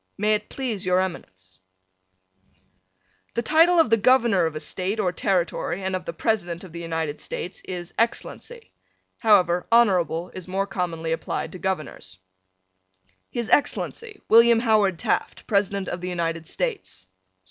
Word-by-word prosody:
May 210 +2 +2
it 210 0 -2
please 235 -8 -3
your 185 -1 +2
Eminence: 95 - -6 1.8
The 235 - 0
title 330 +5 +4
of 320 - +3
the 225 - +6
Governor 225 -6 +4
of 160 - -6
a - - -3
State 185 +7 -3
or 185 -4 +1
territory 180 0 -1
and 190 0 -1
of 185 - -5
the - - -3
President 175 -2 -1
of 185 - -11
the 170 - -6
United 160 -3 -3
States 180 - -5
is 175 -2 -6
Excellency. 455 - -3 0.5
However, 180 -6 +3
Honorable 185 -7 +3
is 185 -1 -8
more 195 +2 -1
commonly 170 -4 -3
applied 165 0 -3
to 185 - -9
Governors: 155 - -4 1.1
His 235 -2 -3
Excellency, 425 +8 0
William 230 0 +6
Howard 210 -6 +2
Taft, - - -2
President 200 -2 0
of 175 - -4
the 180 - -4
United 165 -2 -3
States. 415 - -4
190 Hz, 145 wpm, -24 LUFS, 170-225 Hz, 1.8 s, the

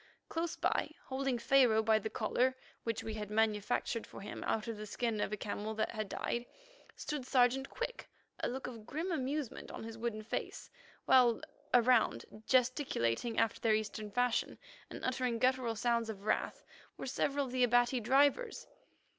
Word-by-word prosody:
Close 330 0 -2
by, - - 0 0.2
holding 265 -1 -1
Pharaoh 235 -2 +4
by 220 0 +4
the 220 - -4
collar, 250 +4 +1 0.3
which 230 -1 -2
we 220 - -4
had 210 -2 -5
manufactured 215 +1 0
for - - -10
him 205 - -6
out 220 +1 -1
of 230 - -3
the 215 0 -7
skin 225 -1 -1
of - - -1
a 210 - -2
camel 210 +1 -4
that 215 - 0
had 215 -3 -4
died, 240 +1 -2 0.5
stood 295 -3 -4
Sergeant 260 +1 +3
Quick, - - -5 0.3
a - - 0
look 260 +2 -4
of 230 -3 -8
grim 325 +7 -3
amusement 280 -3 -3
on - - -7
his 225 0 -8
wooden 225 -2 -3
face, 225 - -5 0.3
while 245 -3 +5 0.3
around, 240 - +4 0.2
gesticulating 245 - +1
after 225 - +1
their 220 -2 +4
Eastern 215 0 -3
fashion, 245 +3 0 0.3
and - - -6
uttering 250 -2 0
guttural 255 -1 +2
sounds 235 0 +1
of 200 -2 -6
wrath, 215 - 0 0.3
were - - -5
several 275 +2 0
of 255 - -7
the 255 0 +2
Abati 245 +1 +4
drivers. 280 - +2
235 Hz, 170 wpm, -34 LUFS, 220-260 Hz, 0.5 s, while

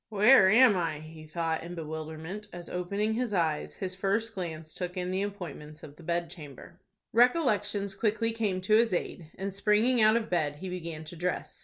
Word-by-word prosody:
"Where 210 -1 +6
am 230 0 +6
I?" 165 -4 -1
he 155 0 -11
thought 165 0 -2
in 175 +1 -7
bewilderment, 160 +5 -6
as, 175 -1 -9
opening 200 +5 -1
his 230 -2 -1
eyes, 160 -4 0
his 190 -3 -4
first 205 +4 -1
glance 160 -4 -6
took 180 0 -5
in 180 0 -2
the 190 +1 0
appointments 165 -7 -7
of 145 - -11
the 170 - -15
bedchamber. 170 -1 -5 0.3
Recollections 210 - +2
quickly 225 +2 0
came 210 -5 -1
to 215 +3 +3
his 225 -3 +4
aid, 170 -2 -4
and, 195 0 -4
springing 215 +5 +3
out 215 +1 +6
of 230 - -2
bed, 150 -5 0
he 185 +5 -7
began 165 -3 -6
to 155 +3 -9
dress. 180 +2 -3
185 Hz, 185 wpm, -29 LUFS, 165-210 Hz, 0.3 s, Where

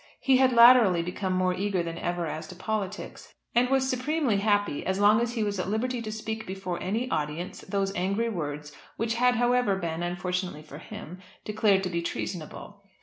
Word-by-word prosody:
He 265 -2 +4
had 260 0 +4
latterly 235 -7 +7
become 185 +2 -3
more 185 0 +1
eager 190 -1 -1
than 165 0 -5
ever 175 0 -2
as 155 0 -5
to 185 - -10
politics, 205 +1 -5 0.2
and 245 +1 +3
was 265 -1 +2
supremely 260 -2 0
happy 205 -6 +1
as 190 +1 -1
long 210 +2 +5
as 240 0 -1
he 225 -3 -1
was 205 -2 -2
at 185 - -2
liberty 240 +3 -1
to 215 -1 -5
speak 220 0 -5
before 185 -2 -4
any 225 +7 -1
audience 155 +5 -3
those 195 0 -2
angry 200 +6 0
words 150 -7 -5 0.2
which 230 +1 0
had 250 +1 +3
however 245 -3 +2
been, 170 -3 -3
unfortunately 180 -2 -3
for 150 -1 -11
him, 175 +2 -9 0.3
declared 210 -2 +2
to 185 - -2
be 170 -1 -1
treasonable. 180 +4 -6
200 Hz, 190 wpm, -27 LUFS, 175-230 Hz, 0.3 s, latterly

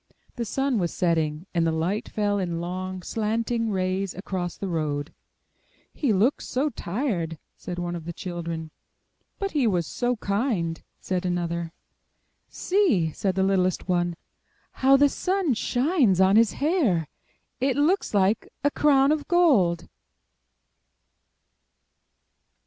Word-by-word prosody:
The 235 - -3
sun 270 +1 0
was 175 -2 -1
setting, 160 -2 0
and 170 -2 +2
the - - +2
light 170 +6 -1
fell 205 -1 0
in 175 -3 -2
long, 185 +1 -4
slanting 225 +2 -1
rays 190 -1 -1
across 185 -2 -4
the 200 - -4
road. 150 -4 -2 0.8
*'He 275 -7 0
looks 215 +8 +1
so 275 +4 0
tired!" 175 - -2 0.2
said 175 -1 -7
one 175 0 -3
of 165 -2 -7
the 170 - -4
children. 170 -2 -5 0.7
*'But 395 -1 -3
he 280 -6 +2
was 180 -5 +1
so 245 +9 -1
kind!" 200 - -1 0.2
said 185 -1 -2
another. 170 -2 -2 0.8
''See!" 260 - +1
said 190 -2 -1
the 190 - +2
littlest 185 -2 +1
one. 175 -1 +1 0.6
"How 270 +1 +4
the 285 +1 +6
sun 365 0 0
shines 245 - +2
on 190 +1 +5
his 225 0 +5
hair! 280 - +1 0.5
It 265 0 +1
looks 310 - +1
like 200 +3 +2
a 285 - +3
crown 280 -1 +4
of 305 -1 -1
gold." 200 - +3
195 Hz, 130 wpm, -25 LUFS, 175-255 Hz, 0.8 s, the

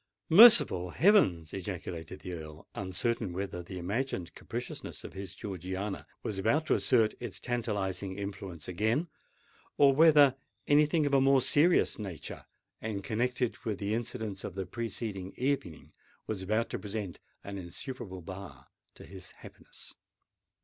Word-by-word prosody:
"Merciful 185 - +8
heavens!" 90 - +3
ejaculated 90 -3 -6
the 90 - -6
Earl, 80 -1 -9
uncertain 100 +1 -2
whether 95 -1 -4
the 90 +2 -8
imagined 95 0 -3
capriciousness - - -6
of - - -9
his 95 -1 -7
Georgiana 95 +1 -5 0.2
was 100 -3 -3
about 130 +11 +2
to - - +2
assert 115 -4 +3
its 120 -5 -5
tantalizing 100 -5 -2
influence 95 -5 -6
again, 110 - 0 0.7
or 140 -1 +6
whether 145 -2 +7 0.3
any 145 +1 +5
thing 155 0 +1
of 140 - -1
a 135 - +5
more 135 0 +5
serious 150 +4 +3
nature, 90 -8 -7 0.3
and 105 -3 -4
connected 125 +3 -1
with 105 -3 -3
the 100 +1 -2
incidents 110 -4 -3
of 95 - -6
the 95 -1 -3
preceding 110 -5 -5
evening, 130 - -2 0.3
was 105 -4 -3
about 110 +4 0
to - - -3
present 105 -4 -5 0.2
an 100 0 -6
insuperable 95 +2 -7
bar 95 +2 -9 0.3
to - - -12
his - - -10
happiness. - - -13
100 Hz, 145 wpm, -31 LUFS, 95-125 Hz, 0.7 s, Merciful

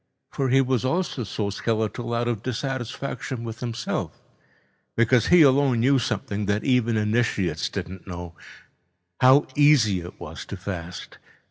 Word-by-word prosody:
For 135 -1 -1
he 135 +2 +5
was 130 -2 0
also 135 -2 -1
so 100 -1 -3
skeletal 115 +2 -2
out 120 0 0
of 115 -4 -2
dissatisfaction 130 0 -4
with 115 -1 -6
himself, 120 -1 -4 0.8
because 120 +1 +3
he 175 -2 +7
alone 135 -3 +4
knew 135 +2 +4
something 105 -3 -2
that 100 +1 0
even 120 -4 +2
initiates 105 -7 0
didn't 95 -1 -7
know—how 90 - -1
easy 140 -10 +4
it 85 +1 -10
was 80 -1 -8
to 100 - -7
fast. 90 -2 -7
115 Hz, 135 wpm, -24 LUFS, 95-130 Hz, 0.8 s, he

